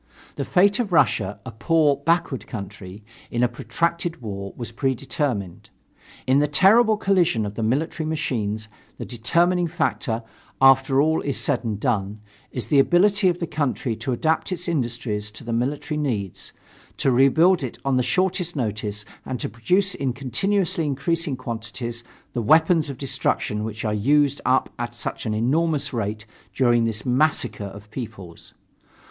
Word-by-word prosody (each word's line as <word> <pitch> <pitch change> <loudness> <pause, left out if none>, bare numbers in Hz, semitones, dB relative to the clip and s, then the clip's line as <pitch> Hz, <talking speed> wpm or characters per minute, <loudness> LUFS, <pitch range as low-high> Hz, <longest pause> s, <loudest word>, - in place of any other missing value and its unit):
The 140 - -3
fate 200 +5 +3
of 220 -6 -1
Russia, 120 - +2
a 130 - -6
poor, 150 +5 +2
backward 155 -3 0
country, 100 -1 -8 0.3
in 120 +1 0
a - - +5
protracted 165 +8 -2
war 100 -4 -6
was 120 -1 -5
predetermined. 130 - -2 0.6
In 130 +2 +4
the 150 - +2
terrible 210 +8 +5
collision 180 - +2
of 100 - -5
the 115 - -5
military 155 +7 -1
machines 110 -8 -2 0.3
the - - -6
determining 170 - +1
factor, 135 -8 -1 0.4
after 135 0 +5
all 160 +1 +1
is 140 - -2
said 135 -4 0
and 110 -3 -3
done, 105 -4 -1 0.3
is 120 -4 -5
the 145 - +5
ability 190 +6 +4
of 175 - -1
the 175 - -2
country 145 -6 -2
to 115 +4 -3
adapt 160 +9 0
its 180 0 -3
industries 120 -8 -2
to 110 +5 -10
the 115 0 -4
military 140 +5 -1
needs, 105 - -3 0.5
to 135 - +2
rebuild 160 +8 +4
it 130 -4 -5
on 135 -1 +2
the - - +3
shortest 175 +6 0
notice 105 -4 -3 0.2
and 130 -2 -4
to - - -2
produce 185 - +1
in 135 -3 -2
continuously 175 - 0
increasing 150 +2 -1
quantities 120 -1 -5 0.3
the 120 - -1
weapons 160 +5 +4
of 135 - -6
destruction 130 -5 -1
which 110 0 -5
are 105 - 0
used 140 +6 +2
up 130 - +2
at 120 0 -4
such 120 - -4
an 110 - -1
enormous 145 +4 +1
rate 110 -2 -3 0.3
during 120 -3 +3
this 110 -2 -3
massacre 130 -4 +1
of 100 +2 -10
peoples. 110 -8 -9
130 Hz, 160 wpm, -23 LUFS, 110-160 Hz, 0.6 s, a